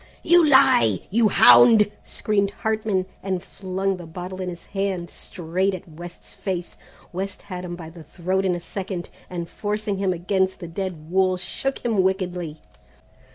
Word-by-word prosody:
"You 345 0 +6
lie, 115 - +5
you 225 +2 +4
hound!" 200 - +7
screamed 200 -2 0
Hartman, 215 -2 -1 0.2
and 190 -2 -2
flung 190 0 -3
the 175 -2 -9
bottle 180 +3 -7
in 185 - -3
his 175 -1 -8
hand 195 -3 -3
straight 185 +3 -2
at 185 +1 -10
West's 175 +2 -11
face. 180 -3 -4 0.4
West 190 +2 -5
had 180 -2 -6
him 175 -1 -5
by 165 -2 -9
the 165 -1 -12
throat 185 +5 -2
in 185 -2 +1
a - - -4
second, 185 0 -6 0.2
and 170 -2 -4
forcing 205 +1 -3
him 195 -1 +1
against 190 +2 0
the 175 - -7
dead 170 -2 -5
wall 185 0 +3
shook 270 +10 -4
him 220 -5 +2
wickedly. 180 -4 -2
185 Hz, 160 wpm, -23 LUFS, 175-195 Hz, 0.4 s, hound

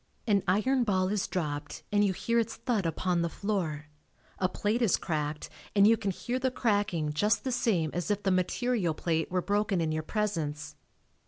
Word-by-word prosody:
An 205 -3 +3
iron 245 +8 +2
ball 190 -4 +1
is 205 -1 0
dropped 145 -4 -4
and 205 0 +3
you 200 - +3
hear 230 +5 0
its 230 0 -1
thud 220 -9 -1
upon 175 +1 0
the 170 - 0
floor, 170 -7 -2 0.5
a 185 - +2
plate 215 +5 -1
is 225 -7 +3
cracked 150 -2 -3 0.3
and 200 0 +6
you 225 +2 +7
can 215 -3 -3
hear 240 +7 -2
the 260 0 +1
cracking 205 -11 0
just 205 +7 +2
the 260 - -1
same 205 -10 +1
as 175 +4 -2
if 205 0 0
the 195 - +2
material 185 0 0
plate 160 -1 -1
were 180 -1 0
broken 205 -2 +1
in 160 -1 0
your 155 0 -1
presence. 155 -6 -2
195 Hz, 190 wpm, -29 LUFS, 165-215 Hz, 0.5 s, you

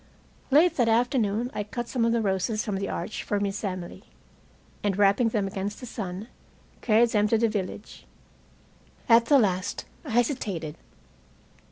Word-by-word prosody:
Late 320 +5 +4
that 240 -3 +3
afternoon 235 -1 +1
I 210 - -2
cut 240 +3 -5
some 235 -2 0
of 230 - +2
the 230 0 +1
roses 200 +3 0
from 205 -4 -2
the 195 - -3
arch 215 - -4
for 205 - -1
Miss 200 +1 -3
Emily, 185 - -5 0.8
and 200 -2 0
wrapping 205 +3 +4
them 215 -3 0
against 195 +1 -4
the 250 - -8
sun, 200 -3 -6 0.5
carried 230 +1 +4
them 210 -1 +3
to 225 - +3
the 230 +1 +3
village. 205 -1 -5 1.0
At 230 0 +6
the 285 +3 +5
last 185 -6 0 0.2
I 300 - -8
hesitated. 215 - -1
215 Hz, 160 wpm, -26 LUFS, 195-235 Hz, 1.0 s, At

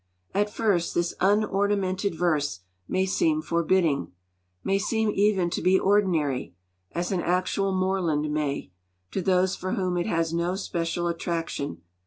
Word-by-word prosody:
At 205 +1 +1
first 200 -6 0
this 175 0 +1
unornamented 200 -1 +1
verse 150 - 0 0.3
may 190 0 +1
seem 155 -4 +1
forbidding, 170 - +1 0.5
may 195 0 +1
seem 220 +1 +1
even 195 -4 +2
to - - -2
be 185 +1 +4
ordinary, 165 - +1 0.4
as 175 +2 -2
an 185 -2 0
actual 185 +3 0
moorland 180 -6 0
may, 145 -9 -2 0.4
to 190 - -1
those 185 0 +2
for 185 - -3
whom 185 -5 0
it 175 - -1
has 165 -4 0
no 170 +2 0
special 175 -3 -2
attraction. 165 - -3
180 Hz, 140 wpm, -26 LUFS, 165-195 Hz, 0.5 s, be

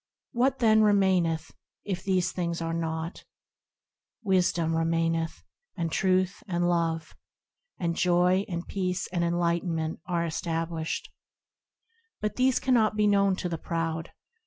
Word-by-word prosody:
What, 260 +3 +2
then, 220 -3 +5
remaineth, 190 -6 +2 0.3
if 185 -3 -3
these 185 -2 +1
things 170 -2 -2
are 165 0 -2
as 165 - -1
naught? 160 +1 -4 1.0
Wisdom 180 -4 +2
remaineth, 165 0 0 0.3
and 165 -2 -2
Truth 185 +2 +1
and 175 -1 0
Love; 165 -2 -1 0.6
And 170 -2 -1
Joy 180 +2 +3
and 170 -2 -4
Peace 180 -2 -2
and 170 -1 +1
Enlightenment 170 -1 0
are 170 -2 0
established. 165 0 -3 1.1
But 210 - -2
these 255 0 +3
cannot 230 -5 +2
be 210 0 +2
known 200 -2 +3
to 185 - -3
the 165 -2 -4
proud. 165 -1 -3
175 Hz, 130 wpm, -28 LUFS, 165-190 Hz, 1.1 s, then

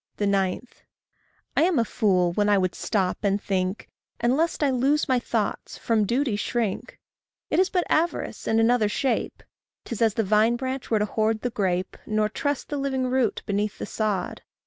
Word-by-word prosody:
9. 200 +2 0 0.9
I - - +3
am 340 -1 +3
a 230 - +3
fool 185 -6 +2
when 205 +4 +1
I 205 - +5
would 185 -2 0
stop 190 -4 -1
and 200 -1 +1
think, 190 0 -2 0.3
And 240 +2 +2
lest 325 0 0
I 280 - +3
lose 270 +4 +2
my 260 -2 +3
thoughts, 225 -3 -3
from 220 -2 +1
duty 245 -1 +1
shrink. 215 -1 -2 0.5
It - - +3
is 375 0 +3
but 360 -2 0
avarice 335 +2 -1
in 225 - +3
another 225 -2 +3
shape. 265 +5 -1 0.4
'Tis 230 -2 -5
as 220 -2 +3
the 225 - +1
vine 215 +3 +3
branch 260 +1 -4
were 225 - +3
to 210 - +1
hoard 220 +1 0
the 245 - -2
grape, 185 -4 -1
Nor 215 0 +1
trust 285 +5 -2
the 290 - -2
living 270 -2 -1
root 255 -4 +1
beneath 205 +1 -1
the - - -4
sod. 210 -3 -2
220 Hz, 185 wpm, -25 LUFS, 205-260 Hz, 0.9 s, I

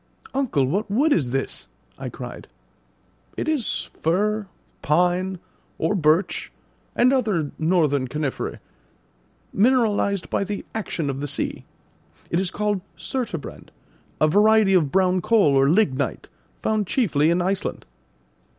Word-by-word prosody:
"Uncle, 235 - +1
what 200 +10 -1
wood 285 +9 +3
is 135 -7 +1
this?" 135 +2 -3 0.3
I - - -4
cried. - - -9 0.9
"It - - -2
is 300 -7 -1
fir, 205 +5 +1 0.3
pine, 180 +4 +1 0.4
or 160 +5 0
birch, 165 0 +1 0.4
and 250 +2 +4
other 210 - 0
northern 155 -5 +2
coniferae, 150 0 -3 1.0
mineralised 210 -4 +2
by - - +1
the 200 0 -5
action 190 -8 -3
of 135 - -6
the 145 - -2
sea. - - -3 0.7
It 170 - +2
is 190 -1 -1
called 210 -1 -1 0.2
surturbrand, 230 - -5 0.5
a 155 - +4
variety 210 +3 +4
of 160 -7 +3
brown 185 -1 +2
coal 210 -7 +4
or 135 +1 +4
lignite, 150 -7 +1 0.3
found 215 -3 0
chiefly 160 - +2
in 170 +1 +2
Iceland." 190 +2 -2
185 Hz, 125 wpm, -23 LUFS, 155-215 Hz, 1.0 s, and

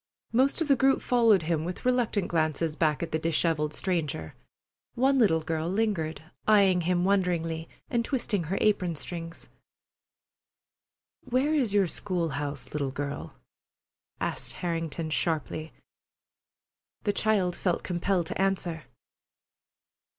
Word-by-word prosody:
Most 265 +7 +3
of 325 - +1
the 275 - +5
group 270 +2 +3
followed 230 -7 +4
him, 160 -1 0
with 180 +6 -6
reluctant 240 -6 +1
glances 155 -1 0
back 155 -2 +1
at 165 - -4
the 160 - 0
dishevelled 160 -1 +1
stranger. 155 - -2 0.6
One 265 +2 +3
little 160 -9 +4
girl 160 +1 -2
lingered, 190 -7 -1 0.3
eying 195 -4 +5
him 175 +1 +1
wonderingly, 170 -4 0 0.2
and 235 -1 0
twisting 230 - -1
her 190 +6 -2
apron 185 -5 +2
strings. 165 +2 -7 1.8
"Where 260 +4 +1
is 250 -9 +1
your 200 -2 +5
school 175 -1 -2
house, 145 -1 -5
little 145 -2 -1
girl?" 140 +1 -5 0.8
asked - - -3
Harrington 165 -2 -3
sharply. 155 -1 -1 1.3
The 205 - +1
child 200 -6 +1
felt 180 -3 -1
compelled 180 0 0
to 175 - -3
answer. 180 -4 -1
175 Hz, 125 wpm, -28 LUFS, 160-205 Hz, 1.8 s, the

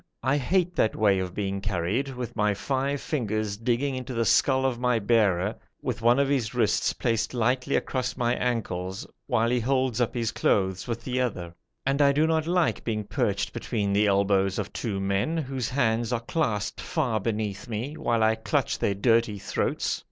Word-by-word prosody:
I 135 +3 +2
hate 180 +6 +1
that 110 - +2
way 100 -3 +3
of 90 -1 -4
being 100 -1 -2
carried, 100 +7 -1
with 125 -1 -5
my 105 -2 +1
five 135 +5 -1
fingers 110 -8 -2
digging 120 +5 0
into 130 0 -5
the 115 0 +1
skull 130 +5 +3
of 125 -3 0
my 125 -1 +2
bearer, 105 -3 +2 0.3
with - - -3
one 120 +2 +4
of 140 0 +3
his 130 -5 0
wrists 110 -4 +2
placed 115 0 -1
lightly 125 +3 +1
across 130 -1 -1
my 120 -1 +1
ankles, 95 -7 -2 0.2
while 115 -3 +2
he 125 - +2
holds 130 -1 0
up 120 - 0
his 115 -2 0
clothes 95 -2 0
with 115 -1 -4
the 130 0 -1
other; 90 -9 -3 0.3
and 135 +2 +1
I 140 -1 +5
do 150 +3 +3
not 160 -1 +1
like 175 -1 +1
being 110 -2 -2
perched - - -1
between 100 -3 -2
the 105 +1 +3
elbows 100 -1 +2
of 105 -1 -4
two 105 -5 -3
men, 100 +11 0
whose 135 -5 -2
hands 120 -3 +1
are 120 - +1
clasped 115 -6 -1
far 130 -10 -1
beneath 105 -1 -3
me, 120 +6 -4
while 115 -5 +1
I 110 0 +4
clutch 110 +1 -1
their 100 - +1
dirty 115 0 +2
throats. - - -1
115 Hz, 190 wpm, -26 LUFS, 105-130 Hz, 0.3 s, I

